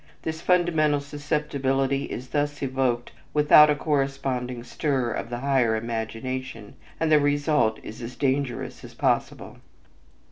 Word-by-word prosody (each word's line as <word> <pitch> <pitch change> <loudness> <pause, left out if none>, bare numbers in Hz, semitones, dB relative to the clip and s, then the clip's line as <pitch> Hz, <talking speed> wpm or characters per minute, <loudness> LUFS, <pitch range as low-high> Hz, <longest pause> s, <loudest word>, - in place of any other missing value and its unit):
This 160 0 -4
fundamental 165 -5 +2
susceptibility 140 -2 -1
is 125 +1 -7
thus 145 -1 -1
evoked 130 -2 -1 0.2
without 150 0 +7
a 150 - +3
corresponding 135 -4 -2
stir 130 -1 -1
of 115 - -4
the 120 0 -4
higher 130 -5 +2
imagination, 115 +1 -4 0.3
and 160 -1 +1
the 150 - +7
result 145 -5 +2
is 110 - -9
as 120 +1 -7
dangerous 135 -2 -2
as - - -11
possible. - - -1
135 Hz, 130 wpm, -25 LUFS, 125-145 Hz, 0.3 s, without